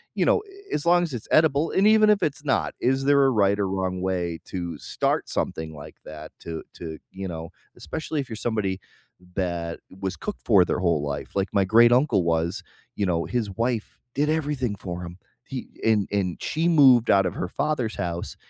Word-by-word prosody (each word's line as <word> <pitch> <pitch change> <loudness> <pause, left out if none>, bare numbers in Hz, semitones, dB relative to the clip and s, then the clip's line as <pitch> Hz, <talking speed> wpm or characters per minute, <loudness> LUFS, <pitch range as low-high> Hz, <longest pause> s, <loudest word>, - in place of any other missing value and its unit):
you - - +2
know, - - +4
eh, 400 -1 -13
as 145 - -1
long 175 +1 +5
as 165 -5 -4
it's 115 -3 -6
edible, 155 0 +3
and 195 - +2
even 215 0 +6
if 210 -1 +3
it's 145 0 -2
not, 135 - +1
is 135 +2 +1
there 140 -1 +5
a - - +5
right 100 -3 +2
or 100 - +1
wrong 95 -1 -2
way 90 -3 -2
to 85 -4 -5
start - - -1
something 80 -1 -3
like 75 - -10
that 75 0 -9
to 80 -1 -6
to 80 -2 -7
you 95 0 -6
know, 80 -2 -6 0.3
especially 155 -1 -4
if 135 - -9
you're 110 - -5
somebody 105 -4 -2 0.6
that 85 -3 -2 0.2
was 95 -1 -3
cooked 210 - -6
for 100 -6 +6
their - - -1
whole 85 -4 +1
life. 70 0 -4
Like 95 0 0
my 100 -2 +3
great-uncle 120 - +5
was, 85 +1 0 0.3
you 105 - -1
know, 85 -3 0
his 120 -4 -2
wife 120 0 -2 0.2
did 145 +3 +1
everything 145 -8 -1
for 90 -2 -6
him. 85 0 -8 0.3
He - - -6 0.2
and 110 -3 +3
and 95 -4 -1
she 160 +2 0
moved 130 -8 +6
out 95 -1 +5
of 90 - -1
her 90 - -3
father's 135 0 -1
house 85 -1 -4
100 Hz, 200 wpm, -25 LUFS, 90-140 Hz, 0.6 s, even